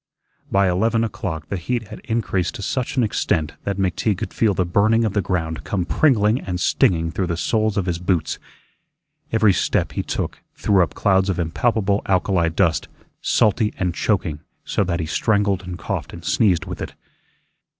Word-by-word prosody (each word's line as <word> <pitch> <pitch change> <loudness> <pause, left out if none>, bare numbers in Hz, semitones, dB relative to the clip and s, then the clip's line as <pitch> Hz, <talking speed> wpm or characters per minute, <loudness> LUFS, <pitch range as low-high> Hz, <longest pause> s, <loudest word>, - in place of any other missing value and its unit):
By 100 0 +4
eleven 110 +6 +2
o'clock 85 -8 -4
the 100 - -2
heat 115 +4 -3
had 105 - -8
increased 110 -6 -1
to 100 - -6
such 130 +4 -2
an 125 - +4
extent 80 -7 0
that 100 -1 -1
McTeague 95 +1 0
could - - -5
feel 105 -4 +2
the 90 - +1
burning 110 +6 +3
of 105 - -1
the 100 - +2
ground 80 -3 -2
come 95 -4 -1
pringling 115 - +3
and 90 -1 -3
stinging 85 -8 +2
through 90 +3 -1
the 85 -2 -2
soles 110 +2 0
of 100 - +1
his 85 -2 -1
boots. 90 -2 0 0.9
Every 110 -3 +4
step - - 0
he - - -2
took - - -3 0.2
threw 100 -3 +3
up 85 - 0
clouds 95 -1 +2
of 95 - 0
impalpable 100 +4 +1
alkali 90 -2 +2
dust, 85 0 +1 0.3
salty 105 +1 +2
and 90 -3 0
choking, 85 -6 0 0.3
so - - +1
that 85 -1 -1
he - - -2
strangled 100 +3 +1
and 90 -2 -7
coughed 85 - -4
and - - -10
sneezed 95 -4 +2
with 90 -2 -6
it. - - -6
95 Hz, 180 wpm, -21 LUFS, 90-110 Hz, 0.9 s, By